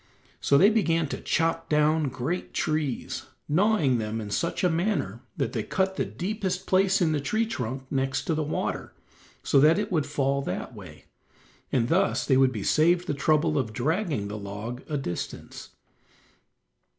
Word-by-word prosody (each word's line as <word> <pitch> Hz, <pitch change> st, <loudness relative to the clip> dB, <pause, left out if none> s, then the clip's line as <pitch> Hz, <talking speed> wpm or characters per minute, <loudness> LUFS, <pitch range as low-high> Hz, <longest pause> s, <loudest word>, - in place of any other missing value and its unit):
So 140 Hz, -, +3 dB
they 200 Hz, +8 st, +6 dB
began 165 Hz, -7 st, +2 dB
to -, -, -5 dB
chop 165 Hz, 0 st, 0 dB
down 150 Hz, 0 st, +3 dB
great 130 Hz, +8 st, -4 dB
trees, 130 Hz, -4 st, -2 dB, 0.2 s
gnawing 155 Hz, -, +3 dB
them 110 Hz, +1 st, -3 dB
in 105 Hz, -2 st, -6 dB
such 170 Hz, -, -1 dB
a -, -, +5 dB
manner 180 Hz, +6 st, -1 dB, 0.2 s
that -, -, -1 dB
they -, -, -1 dB
cut 190 Hz, 0 st, -1 dB
the -, -, -1 dB
deepest 190 Hz, -1 st, -3 dB
place 190 Hz, +1 st, +3 dB
in 160 Hz, -, +2 dB
the 150 Hz, -2 st, 0 dB
tree 220 Hz, +11 st, 0 dB
trunk 130 Hz, -, -4 dB
next 135 Hz, -1 st, 0 dB
to 165 Hz, -, -1 dB
the 155 Hz, -, 0 dB
water, 150 Hz, -, -3 dB, 0.5 s
so 140 Hz, -, +4 dB
that 155 Hz, +5 st, +6 dB
it 210 Hz, +1 st, -2 dB
would 155 Hz, -6 st, +1 dB
fall 140 Hz, -1 st, 0 dB
that 135 Hz, -, -4 dB
way, 90 Hz, -8 st, -12 dB, 0.7 s
and 120 Hz, -3 st, +2 dB
thus 190 Hz, +7 st, +2 dB
they 135 Hz, -, +3 dB
would 130 Hz, 0 st, +4 dB
be 105 Hz, -5 st, -4 dB
saved 170 Hz, +3 st, +3 dB
the 165 Hz, -, -1 dB
trouble 155 Hz, +2 st, +2 dB
of 115 Hz, -5 st, -3 dB
dragging 150 Hz, -, -1 dB
the 105 Hz, +1 st, -5 dB
log 105 Hz, +5 st, -6 dB
a 150 Hz, -, -1 dB
distance. 85 Hz, -11 st, -6 dB
150 Hz, 175 wpm, -26 LUFS, 130-175 Hz, 0.7 s, they